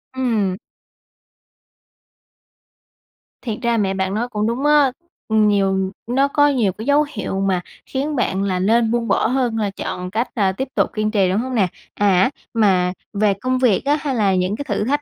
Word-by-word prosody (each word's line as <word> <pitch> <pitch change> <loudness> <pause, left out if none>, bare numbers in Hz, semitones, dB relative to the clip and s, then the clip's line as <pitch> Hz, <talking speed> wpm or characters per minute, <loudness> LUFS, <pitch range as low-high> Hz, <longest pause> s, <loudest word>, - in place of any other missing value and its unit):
Ừm. 220 -8 0 2.8
Thiệt 225 -4 -4
ra 235 -1 +1
mẹ 195 -3 +1
bạn 190 0 -2
nói 230 +4 -1
cũng 215 -2 -1
đúng 240 +5 -2
á, 295 -3 +5 0.4
ừm, 220 -1 +3
nhiều 195 -2 +1 0.2
nó 270 +4 +2
có 290 +1 +3
nhiều 245 -9 +1
cái 215 +4 -8
dấu 290 +2 +3
hiệu 195 - -3
mà 190 -2 +1 0.2
khiến 285 +3 -3
bạn 195 -6 0
là 185 -2 -1
nên 225 +4 +2
buông 235 -1 0
bỏ - - +2
hơn 245 -2 0
là 210 -2 0
chọn 180 -2 -5
cách, 225 +4 -1
à, 200 -5 +2
tiếp 265 +8 -4
tục - - +2
kiên 215 0 -1
trì, 195 -4 +2
đúng 190 +3 +1
hông 255 +2 -3
nè? 200 -5 +3 0.3
À, 195 0 +3 0.2
mà 190 -5 +2 0.2
về 205 0 +2
công 255 +6 -2
việc 245 -4 +2
á 290 +1 +3
hay 275 -3 -2
là 200 -4 +2
những 185 +2 0
cái 285 - -6
thử - - -1
thách 290 +4 0
215 Hz, 190 wpm, -20 LUFS, 195-255 Hz, 2.8 s, á